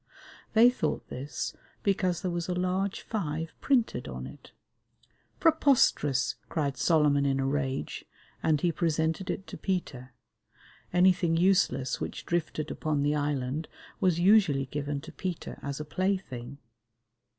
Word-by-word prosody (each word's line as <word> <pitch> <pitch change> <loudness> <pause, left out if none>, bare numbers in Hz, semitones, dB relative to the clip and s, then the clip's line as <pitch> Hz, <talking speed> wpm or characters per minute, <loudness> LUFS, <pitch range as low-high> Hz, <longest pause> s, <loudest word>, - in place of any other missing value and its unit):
They 235 +2 +7
thought 255 - -2
this 140 +3 -4 0.3
because 185 -3 +1
there 185 - 0
was 175 0 -3
a 180 - 0
large 185 +2 -1
five 165 -6 -3
printed 240 - +1
on 65 -1 -6
it. 65 - -12 0.9
"Preposterous!" 265 - +3
cried 140 -4 -1
Solomon 150 -2 +3
in 135 -1 +1
a 135 - 0
rage, 135 - -2 0.4
and 155 -2 +2
he 175 - +2
presented 160 +2 0
it 195 - -3
to - - -9
Peter; 135 -9 -3 0.8
anything 180 -2 +4
useless 175 -7 +2
which - - -5
drifted 165 -3 -2
upon 150 -2 -1
the 145 +1 +2
island 145 0 -1 0.3
was 180 -3 +2
usually 175 -8 +4
given 145 +1 -3
to 165 - -10
Peter 175 +2 -5
as 140 0 -4
a 150 - -4
play 185 +6 +1
thing. 130 -6 -9
160 Hz, 140 wpm, -29 LUFS, 140-185 Hz, 0.9 s, They